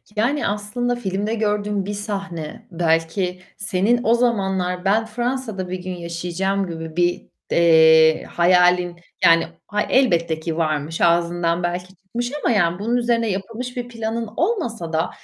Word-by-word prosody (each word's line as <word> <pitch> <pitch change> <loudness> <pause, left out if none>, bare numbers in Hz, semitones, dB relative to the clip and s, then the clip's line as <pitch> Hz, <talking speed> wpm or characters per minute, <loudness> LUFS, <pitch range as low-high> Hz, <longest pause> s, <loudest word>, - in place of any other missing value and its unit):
Yani, 255 +7 +1
aslında 210 +4 -2
filmde 205 -1 -2
gördüğün 210 -2 -1
bir 205 - -3
sahne 195 -6 -5
belki 170 +2 0 0.2
senin 215 +3 +1
o 225 - +4
zamanlar 190 -6 0
ben 215 +3 +3
Fransa'da 230 -4 -3
bir 185 0 -5
gün 185 0 -4
yaşayacağım 180 +3 -2
gibi 160 -1 -7
bir, 175 0 +1 0.3
eee, 160 -1 +6
hayalin 180 0 +3 0.3
yani 165 0 +5 0.2
hay 210 0 -1
elbette 170 -11 +2
ki 160 0 -4
varmış, 155 -1 -1
ağzından 170 0 +2
belki 180 +2 -3
çıkmış 230 +7 -5
ama - - +2
yani 175 -2 +2
bunun 230 +4 0
üzerine 235 -1 +1
yapılmış 230 +6 -5
bir 245 -1 -3
planın 230 -1 -3
olmasa 240 - -1
da 160 +2 +1
190 Hz, 140 wpm, -21 LUFS, 170-225 Hz, 0.3 s, eee